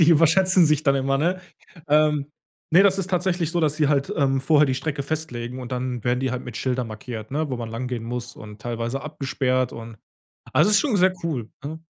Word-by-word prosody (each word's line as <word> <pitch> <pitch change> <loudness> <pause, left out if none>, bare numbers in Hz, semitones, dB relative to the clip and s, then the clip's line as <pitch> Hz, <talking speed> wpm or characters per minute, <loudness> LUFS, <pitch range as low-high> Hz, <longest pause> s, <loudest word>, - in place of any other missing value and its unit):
Die 165 - +6
überschätzen 170 +3 +5
sich 155 -1 +2
dann 140 -3 +3
immer, 135 0 +1
ne? 180 +5 0 0.5
Ähm, 150 -1 +2 0.4
ne, 180 +4 +7
das 195 -1 +4
ist 195 0 -2
tatsächlich 180 -2 0
so, 175 - 0
dass 155 -2 +2
sie 150 -3 +2
halt, 140 -2 +1
ähm, 135 -2 +2
vorher 150 +2 +4
die 130 - 0
Strecke 140 +2 -3
festlegen 130 -5 -4
und 125 0 -7
dann 125 -2 -3
werden 125 +1 +1
die 130 -1 0
halt 125 0 -4
mit 120 -2 -7
Schildern 125 -1 -1
markiert, 110 0 -7
ne, 150 +1 -2
wo 130 - -2
man 115 -1 -6
lang 115 +3 -4
gehen 125 -2 -4
muss 120 0 -5
und 105 -1 -11
teilweise 120 +3 -3
abgesperrt 135 -3 -1
und 115 -1 -9 0.6
also, - - +4
ist 205 - +6
schon 255 -9 +1
sehr 185 0 +4
cool, 130 -10 -3
ne? 160 +3 -6
135 Hz, 220 wpm, -23 LUFS, 125-160 Hz, 0.6 s, ne